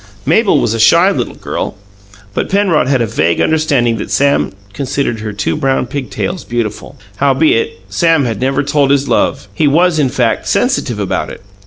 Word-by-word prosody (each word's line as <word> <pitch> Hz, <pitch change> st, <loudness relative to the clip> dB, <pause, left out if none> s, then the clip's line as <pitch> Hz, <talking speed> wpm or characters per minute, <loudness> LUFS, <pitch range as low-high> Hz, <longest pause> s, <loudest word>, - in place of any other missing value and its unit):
Mabel 170 Hz, -, +3 dB
was 115 Hz, -, 0 dB
a 115 Hz, -, -3 dB
shy 170 Hz, -, +5 dB
little -, -, -3 dB
girl; -, -, -4 dB, 0.6 s
but -, -, -2 dB
Penrod 190 Hz, -9 st, +2 dB
had 130 Hz, -3 st, +2 dB
a -, -, 0 dB
vague 85 Hz, -5 st, 0 dB
understanding 140 Hz, -7 st, +1 dB
that -, -, -5 dB
Sam 140 Hz, 0 st, +1 dB, 0.2 s
considered 135 Hz, -3 st, -2 dB
her 110 Hz, 0 st, -5 dB
two 95 Hz, -5 st, -2 dB
brown 135 Hz, -1 st, 0 dB
pig 130 Hz, +1 st, -5 dB
tails 180 Hz, 0 st, -4 dB
beautiful. 120 Hz, -3 st, -4 dB, 0.2 s
Howbeit, 135 Hz, -8 st, +1 dB
Sam 160 Hz, -, +2 dB
had 115 Hz, -2 st, -3 dB
never 135 Hz, +2 st, +1 dB
told 145 Hz, -1 st, +1 dB
his 140 Hz, 0 st, +2 dB
love; 140 Hz, -, 0 dB
he 155 Hz, -, +1 dB
was, 165 Hz, +3 st, +3 dB
in 140 Hz, -3 st, +2 dB
fact, 125 Hz, -3 st, 0 dB
sensitive -, -, 0 dB
about -, -, -2 dB
it. -, -, -10 dB
140 Hz, 180 wpm, -14 LUFS, 120-155 Hz, 0.6 s, shy